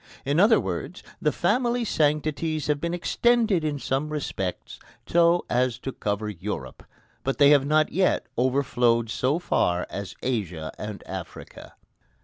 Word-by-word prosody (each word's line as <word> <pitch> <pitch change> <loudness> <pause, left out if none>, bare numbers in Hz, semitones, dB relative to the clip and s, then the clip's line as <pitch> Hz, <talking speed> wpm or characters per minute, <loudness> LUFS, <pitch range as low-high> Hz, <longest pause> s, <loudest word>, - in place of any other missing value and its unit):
In 145 +4 +1
other 220 +4 +6
words - - -5 0.2
the - - +2
family 245 -1 +1
sanctities 155 -1 0
have 145 -1 0
been 170 - -1
extended 220 0 +2
in 150 -2 -1
some 135 +2 -2
respects 130 -11 -4 0.3
so 170 +1 +3
as 125 -1 +1
to 135 +2 -5
cover 105 -2 -3
Europe, 100 -5 -6 0.4
but 135 - -1
they 145 -1 +6
have 140 -2 +4
not 155 +1 +3
yet 185 +1 +1
overflowed 120 -3 +1
so 130 +6 +1
far 90 - 0
as 100 -2 -6
Asia 90 -11 -2
and 105 -1 -6
Africa. - - -9
145 Hz, 140 wpm, -25 LUFS, 120-165 Hz, 0.4 s, other